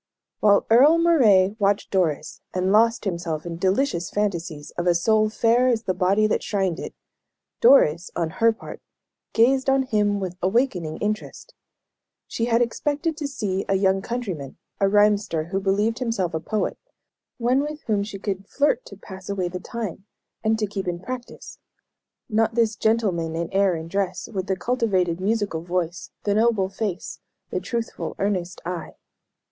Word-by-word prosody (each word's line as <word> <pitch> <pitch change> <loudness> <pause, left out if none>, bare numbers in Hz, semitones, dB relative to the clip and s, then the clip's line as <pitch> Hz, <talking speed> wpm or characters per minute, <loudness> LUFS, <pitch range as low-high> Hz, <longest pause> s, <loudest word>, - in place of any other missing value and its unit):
While 205 -1 +4
Earle 280 +8 +7
Moray 220 - +4
watched 200 0 +1
Doris, 175 -7 -1
and 185 +1 +1
lost 230 +2 +3
himself 170 -4 -3
in 170 -1 -5
delicious 190 0 0
fancies 170 -7 -3
of 175 +1 -3
a 175 - +4
soul 215 +4 +3
fair 235 +3 +3
as 235 -3 +1
the 185 - 0
body 190 +4 +2
that 215 - +1
shrined 190 -4 -1
it, - - -7 0.6
Doris, 180 - +5
on 165 -2 -1
her 230 0 +6
part, 225 - -10 0.5
gazed 260 +4 +3
on 270 0 +3
him 210 -4 +1
with 185 -2 -5
awakening 185 - 0
interest. 215 - -4 0.7
She 230 - -2
had 235 0 +3
expected 295 +7 -2
to 300 -3 -3
see 200 -9 -2
a 195 - +3
young 190 0 +2
countryman, 190 - -5 0.2
a 195 - +3
rhymster 205 -5 +3
who 195 +1 -1
believed 205 +4 0
himself 225 -9 -1
a 160 - -1
poet, 210 +6 -2 0.6
one 245 +2 +2
with 300 +1 -3
whom 210 -3 0
she 205 -1 -6
could 195 -1 -4
"flirt 285 -3 +1
to 200 - -11
pass 190 -1 -11
away 190 -3 -1
the 180 +1 -5
time," 205 -2 -6 0.4
and 220 0 +2
"to 215 - 0
keep 195 -2 -5
in 175 -1 -2
practice" 245 +6 -8 0.7
not 225 0 +1
this 225 -2 +2
gentleman 190 -8 0
in 170 +1 -3
air 195 -2 +3
and 160 +1 -7
dress, 190 -2 -2
with 190 -1 -3
the 190 - +1
cultivated 185 -6 0
musical 205 -5 0
voice, 175 0 -3
the 205 - +1
noble 215 -3 +2
face, 195 -2 -4 0.3
the 185 - -1
truthful, 230 +5 -4
earnest 185 -3 -2
eye. 175 -2 -5
200 Hz, 165 wpm, -23 LUFS, 180-230 Hz, 0.7 s, Earle